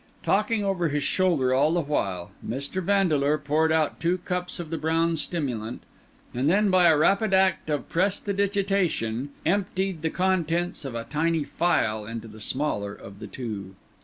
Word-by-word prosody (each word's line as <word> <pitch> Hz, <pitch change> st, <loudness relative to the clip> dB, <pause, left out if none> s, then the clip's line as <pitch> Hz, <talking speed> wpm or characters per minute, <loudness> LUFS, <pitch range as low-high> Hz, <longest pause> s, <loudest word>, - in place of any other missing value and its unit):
Talking 225 Hz, -4 st, +1 dB
over 185 Hz, -3 st, +1 dB
his 145 Hz, 0 st, -1 dB
shoulder 145 Hz, -5 st, +2 dB
all 145 Hz, +5 st, +3 dB
the 175 Hz, -, +2 dB
while, 95 Hz, -, -2 dB
Mr. 140 Hz, +9 st, -3 dB
Vandeleur 160 Hz, -7 st, +2 dB
poured 155 Hz, +2 st, +1 dB
out 160 Hz, -2 st, +1 dB
two 175 Hz, +2 st, +1 dB
cups 180 Hz, 0 st, -3 dB
of 170 Hz, -2 st, -6 dB
the 165 Hz, -, -1 dB
brown 165 Hz, +1 st, +1 dB
stimulant, 125 Hz, -9 st, -3 dB, 0.5 s
and 130 Hz, +4 st, +1 dB
then, 200 Hz, +3 st, +3 dB
by 185 Hz, -1 st, +5 dB
a 160 Hz, -2 st, +5 dB
rapid 195 Hz, +5 st, +3 dB
act 190 Hz, -4 st, +2 dB
of 150 Hz, -2 st, -1 dB
prestidigitation, 195 Hz, -, 0 dB, 0.2 s
emptied 190 Hz, -1 st, 0 dB
the 160 Hz, -, 0 dB
contents 175 Hz, -3 st, 0 dB
of 130 Hz, -3 st, -5 dB
a 115 Hz, -, -3 dB
tiny 160 Hz, +3 st, 0 dB
phial 110 Hz, -11 st, 0 dB
into 115 Hz, 0 st, -6 dB
the 110 Hz, 0 st, -12 dB
smaller 105 Hz, -6 st, -1 dB
of 100 Hz, 0 st, -12 dB
the 110 Hz, -, -7 dB
two. 100 Hz, -4 st, -6 dB
160 Hz, 160 wpm, -26 LUFS, 130-185 Hz, 0.5 s, by